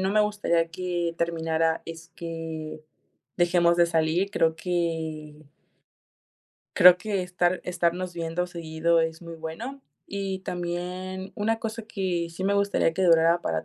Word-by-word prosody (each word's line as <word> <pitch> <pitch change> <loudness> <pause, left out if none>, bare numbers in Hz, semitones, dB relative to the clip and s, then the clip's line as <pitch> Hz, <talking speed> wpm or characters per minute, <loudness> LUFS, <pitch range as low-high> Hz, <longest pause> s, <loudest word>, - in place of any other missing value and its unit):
no 190 +1 0
me 215 - +4
gustaría 205 -6 +1
que, 175 -1 -2
terminara 165 -1 0
es 165 0 -9
que, 165 -2 -6 0.6
dejemos 170 -1 +3
de 170 -1 +5
salir. 165 +4 +1
Creo 160 -5 +2
que 160 -3 -3 1.3
creo 180 0 +9
que 200 -3 -2
estar 180 0 0
estarnos 175 0 -1
viendo 170 +1 -2
seguido 165 -1 0
es 160 +1 -2
muy 170 0 -8
bueno, 225 +13 -6 0.3
y 195 -1 -3
también 180 +2 -4
una 225 +2 0
cosa 225 0 -4
que, 185 -6 -2
sí 185 +3 -5
me 200 +1 +2
gustaría 200 -4 +2
que 190 - 0
durara 165 -1 +5
para 80 -1 -1
175 Hz, 140 wpm, -26 LUFS, 165-185 Hz, 1.3 s, creo